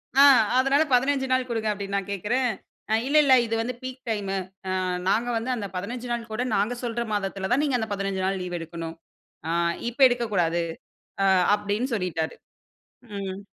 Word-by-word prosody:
ஆ, - - +4 0.4
அதனால 275 +3 +4
15 265 +1 +2
நாள் 255 0 +2
குடுங்க 225 -2 -1
அப்டின்னு 200 -1 -4
நான் 195 0 -4
கேக்கறேன். 240 +6 0 0.4
அ - - +3
இல்ல, 295 +2 +3
இல்ல 270 - +5
இது 225 0 -2
வந்து 250 +2 -3
பீக் 255 0 -6
டைமு 200 -3 -1 0.7
நாங்க 230 +4 +2
வந்து 230 +3 -3
அந்த 205 -4 -4
15 240 +6 -4
நாள் 230 -1 -4
கூட 220 +3 -1
நாங்க 205 +5 +1
சொல்ற 235 0 -1
மாதத்தில 195 -1 -2
தான் 255 +4 +4
நீங்க 275 -4 +1
அந்த 220 - -2
15 195 -1 -1
நாள் 195 0 -1
லீவ் 180 -1 -4
எடுக்கணும். 165 0 -6 0.5
ஆ - - 0 0.4
இப்ப 240 - -14
எடுக்கக்கூடாது 200 -9 0 0.6
அ - - +4 0.3
அப்டின்னு 210 +5 -2
சொல்லிட்டாரு. 165 -5 -2 0.8
ம். 195 -1 -4
220 Hz, 170 wpm, -25 LUFS, 195-250 Hz, 0.8 s, இல்ல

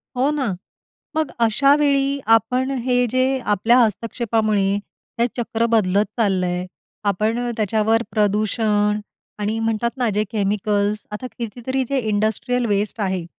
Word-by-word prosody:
हो 260 +3 +2
ना. 270 -9 -1 0.6
मग 315 -2 0
अशावेळी 275 +4 +3 0.2
आपण 250 +4 -1 0.2
हे 250 -1 +3
जे 255 +1 +2 0.3
आपल्या 225 +5 +4
हस्तक्षेपामुळे, 215 -3 +1 0.5
हे 235 - +4
चक्र 230 -1 0
बदलत 200 -1 +3
चाललंय. 185 -4 0 0.4
आपण 215 +3 +1 0.2
त्याच्यावर 220 +2 +1
प्रदूषण 210 0 +1 0.4
आणि 210 +2 -1
म्हणतात 225 +1 0
ना, 250 -2 +1
जे 210 +1 +1
केमिकल्स 205 0 0
आता 210 +5 -5
कितीतरी 245 +3 -3
जे 275 - 0
इंडस्ट्रियल 220 +4 0
वेस्ट 205 +1 -1
आहे. 190 -3 -1
220 Hz, 120 wpm, -21 LUFS, 205-245 Hz, 0.6 s, आपल्या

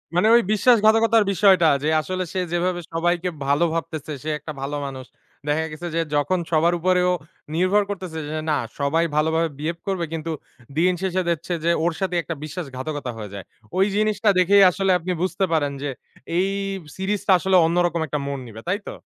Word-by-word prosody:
মানে 180 +5 +4
ওই 235 - +6
বিশ্বাসঘাতকতার 225 0 +4
বিষয়টা 190 -3 +5 0.2
যে, 155 - +1
আসলে 185 +3 -3
সে 190 - -1
যেভাবে 175 0 0
সবাইকে 175 +2 0 0.2
ভালো 145 +4 +3
ভাবতেছে, 160 -2 -4
সে 155 - -3
একটা 155 - -7
ভালো 140 +2 -3
মানুষ। 130 -2 -7 0.4
দেখা 150 +2 +1
গেছে 160 +3 -6
যে, - - +1 0.2
যখন 145 +6 +1
সবার 165 +2 +3
উপরে 180 +1 +2
ও - - +2 0.4
নির্ভর 185 +4 +3
করতেছে 185 -5 -5
যে, - - -7
যে 155 - -2
না, 150 - +2 0.2
সবাই 150 +4 +2
ভালোভাবে 160 +2 +2
বিহেভ 165 +3 -3
করবে 190 -3 -1
কিন্তু, 165 0 -3 0.5
দিন 180 +3 +4
শেষে 185 -1 0
দেখছে 170 +1 -2
যে, 170 - +3
ওর 170 0 +1
সাথেই 180 -2 0
একটা 165 - -4
বিশ্বাসঘাতকতা 145 -4 -5
হয়ে 105 -2 -7
যায়। 100 -2 -7 0.3
ওই 190 - +5
জিনিসটা 215 0 +2
দেখেই 200 +2 +6
আসলে 195 +1 0
আপনি 180 +2 -4
বুঝতে 190 +1 0
পারেন 145 -3 +1
যে, 145 - -1 0.5
এই 185 +2 +2 0.5
সিরিজটা 195 +1 -1
আসলে 190 +2 +1
অন্যরকম 170 0 +1
একটা 150 - -2
মোড় 140 -1 -4
নিবে। 110 -1 -10
তাই 195 +3 0
তো? - - -5
170 Hz, 185 wpm, -23 LUFS, 155-190 Hz, 0.5 s, ওই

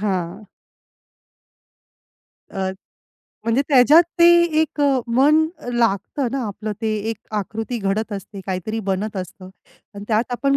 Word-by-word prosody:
हां. 190 0 -3 2.0
अ, 190 -1 -2 0.7
म्हणजे 230 +4 +2
त्याच्यात 290 +4 +7 0.2
ते 340 - +8 0.4
एक 310 - -4
अ, 275 -2 +3 0.2
मन 305 +4 +5 0.3
लागतं 240 +3 0
ना 270 -1 -1
आपलं 210 +1 -5
ते 220 -1 0 0.2
एक 225 - -4 0.2
आकृती 225 +4 -3
घडत 210 +2 -2
असते, 195 0 -7
काहीतरी 195 +4 -3
बनत 200 +2 -2
असतं 185 0 -7 0.5
आणि 200 0 -8
त्यात 225 +3 0
आपण 275 +3 +1
220 Hz, 125 wpm, -21 LUFS, 195-255 Hz, 2.0 s, ते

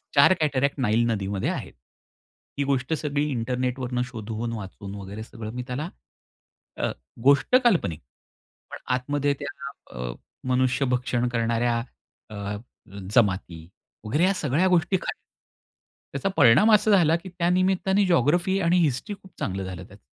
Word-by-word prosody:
4 140 +7 +7
cataract 140 -2 +1
Nile 115 +1 +2
नदीमध्ये 100 -2 -1
आहेत. - - -4 0.8
ही 140 - +1
गोष्ट 135 +2 0
सगळी 150 -1 -1
इंटरनेटवरून 125 +1 -2
शोधून 115 -1 -5
वाचून 100 -1 -7
वगैरे 100 +2 -7
सगळं 110 -1 -8
मी 125 - -4
त्याला, 145 +7 -3 0.9
अ, - - -1 0.3
गोष्ट 140 - +4
काल्पनिक 165 - +2 0.7
पण - - -6 0.2
आतमध्ये 145 +2 0
त्या 145 0 -6 0.3
अ, - - -3 0.4
मनुष्य 130 +1 +2
भक्षण 125 -1 0
करणाऱ्या 115 0 +1 0.5
अ, 105 -1 -5 0.6
जमाती 95 -7 +1 0.4
वगैरे 150 +11 +1
या 195 +1 +4
सगळ्या 165 +1 +1
गोष्टी 180 +1 +3
खऱ्या. - - -4 1.0
त्याचा 195 - -1
परिणाम 145 - +6
असा 215 +1 +5
झाला, 165 -5 +5
की 180 +3 -6
त्या 175 -1 -1
निमित्ताने 190 +2 +2
जिओग्राफी 175 +4 +2
आणि 170 +2 +3
हिस्ट्री 160 - 0
खूप 190 - -16
चांगलं 95 0 -2
झालं 95 -1 -6
त्याचं. 100 +1 -16
130 Hz, 135 wpm, -25 LUFS, 115-170 Hz, 1.0 s, 4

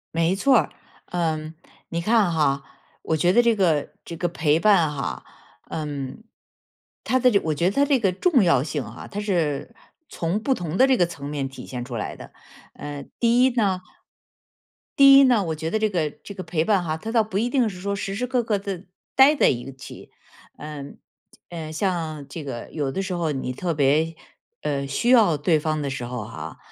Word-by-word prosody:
没 165 +2 +2
错 260 +6 +4
儿， - - +1 0.4
嗯。 160 -2 -2 0.3
你 170 0 -2
看 215 -1 +3
哈， 140 -3 +1 0.4
我 160 - 0
觉 175 +4 +3
得 240 - +6
这 235 -1 +3
个 165 -8 +1
这 170 - -8
个 175 - 0
陪 155 -2 +1
伴 175 -5 +4
哈， 135 - -4 0.5
嗯。 145 +2 -5 0.8
它 260 - +2
的 250 0 +5
这 200 - +4
我 155 - -1
觉 170 +3 -1
得 185 - +3
它 280 - +4
这 280 -2 +2
个 195 -5 +2
重 265 - +3
要 140 -7 +3
性 150 -1 -3
啊， - - -10
它 205 - -4
是 170 -9 -1 0.3
从 175 +6 -2
不 265 +4 +1
同 175 -6 -4
的 260 - +6
这 265 - +4
个 175 - +4
层 145 -4 -7
面 140 -2 -3
体 130 -1 -10
现 125 -2 -5
出 125 -1 -7
来 105 - -4
的。 - - -12 0.4
呃， 145 -1 -7 0.2
第 240 +1 +4
一 260 - +5
呢。 195 -6 +1 1.2
第 275 -1 +9
一 275 - +8
呢， 245 -6 +4
我 160 -1 -2
觉 160 +1 -4
得 220 - +1
这 215 0 +1
个 165 -6 -1
这 200 - -12
个 185 - -6
陪 160 -4 -1
伴 195 0 +2
哈， 160 -2 -2
它 220 +8 -6
倒 225 -1 +3
不 205 -2 -4
一 235 +3 0
定 250 -2 +2
是 190 -4 -6
说 200 +1 -2
时 195 -1 -4
时 250 +5 -2
刻 250 -1 0
刻 215 -3 0
地 195 -2 -6 0.3
待 270 +3 +7
在 - - +4
一 125 +2 -3
起。 130 0 -12 0.5
嗯， 145 -2 -8 0.5
呃， 160 -3 -6
像 160 -4 -2
这 155 +3 -7
个 120 -4 -6
有 145 -4 -2
的 195 - -2
时 190 -1 -3
候 165 -3 -1
你 130 -2 -3
特 170 +6 -2
别， 155 +3 +2 0.5
呃， 140 -2 -2
需 140 - -1
要 225 -10 +6
对 155 +2 +2
方 155 0 -1
的 140 - -2
时 130 -2 -4
候 120 -3 -5
哈， 80 - -8
170 Hz, 225 characters per minute, -23 LUFS, 145-210 Hz, 1.2 s, 第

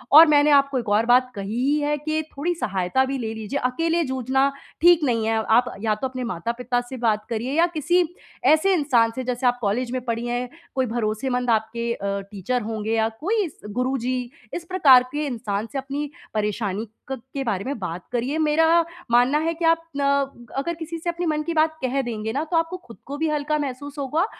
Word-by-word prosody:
और 320 +2 +12
मैंने 295 0 +5
आपको 275 -1 +3
एक 230 - -5
और 210 +2 +3
बात 250 +1 +4
कही 200 +2 -4
ही 290 +2 +2
है 295 0 0
कि 310 +2 -1 0.2
थोड़ी 345 +5 0
सहायता 195 - 0
भी 270 +1 -2
ले 225 -3 -3
लीजिए, 220 +5 -3
अकेले 330 +7 +1
जूझना 265 0 +1 0.3
ठीक 345 -1 +6
नहीं 230 -5 +1
है। 225 - +2
आप 240 +3 +3
या 215 -1 +1
तो 240 +5 -2
अपने 255 -1 -5
माता-पिता 235 +5 -2
से 260 - -6
बात 215 -3 +1
करिए 235 +3 -2
या 335 - +6
किसी 345 +4 +3 0.5
ऐसे 380 +5 +3
इंसान 250 -8 +3
से, 260 - -3
जैसे 250 0 0
आप 245 0 +2
कॉलेज 235 +4 0
में 255 0 -2
पढ़ी 230 0 -2
हैं, 245 +1 -2 0.3
कोई 260 -1 +2
भरोसेमंद 240 +2 -1
आपके 230 +1 0
अ, 200 -2 -3
टीचर 225 +5 -2
होंगे 220 0 -3
या 220 0 +2
कोई 425 +7 +1
इस 310 - -10
गुरुजी, 250 +1 -1 0.2
इस 340 - -4
प्रकार 280 -9 +7
के 300 +1 -2
इंसान 225 -5 -3
से 280 - -4
अपनी 280 +2 -4 0.2
परेशानी 210 0 -2 0.2
क 265 - -4
के 275 - -2
बारे 205 -6 -1
में 280 0 -3
बात 180 -2 -5
करिए। 250 +5 -1
मेरा 315 +1 +3 0.5
मानना 245 +5 +4
है 325 +2 0
कि 335 0 -3
आप 330 0 +4 0.2
ना 280 0 +1 0.5
अगर 310 +6 -1
किसी 330 0 -6
से 345 - -3
अपने 345 +1 -2
मन 305 -2 0
की 335 +2 -3
बात 315 0 +2
कह 260 +2 +1
देंगे 220 -3 -4
ना, 285 +4 0
तो 330 +1 -1
आपको 330 +2 0
खुद 235 -10 -15
को 285 +2 -6
भी 320 +1 0
हल्का 300 0 0
महसूस 285 +1 -5
होगा 300 +6 +1
255 Hz, 210 wpm, -23 LUFS, 230-300 Hz, 0.5 s, और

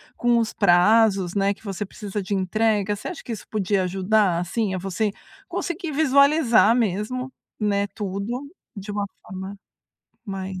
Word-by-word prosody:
com 240 -1 +2
os 225 -1 0
prazos, 195 0 +4
né, 200 0 +2
que 195 - -22
você 200 -1 -4
precisa 205 0 -5
de 195 +2 -4
entrega. 205 +1 +1
Você - - -7
acha 360 - -8
que 240 - -7
isso 215 - -6
podia 200 -2 0
ajudar, 190 0 +2
assim, 190 +3 -1
a - - -1
você 195 +3 -1 0.4
conseguir 345 -1 -3
visualizar 280 -5 +4
mesmo, 240 +4 -1 0.3
né, 205 -1 +1
tudo 200 +5 -4 0.3
de 200 +1 -8
uma 205 0 -1 0.2
forma 190 +2 -8 0.7
mais 190 -2 -5
205 Hz, 155 wpm, -23 LUFS, 190-230 Hz, 0.7 s, prazos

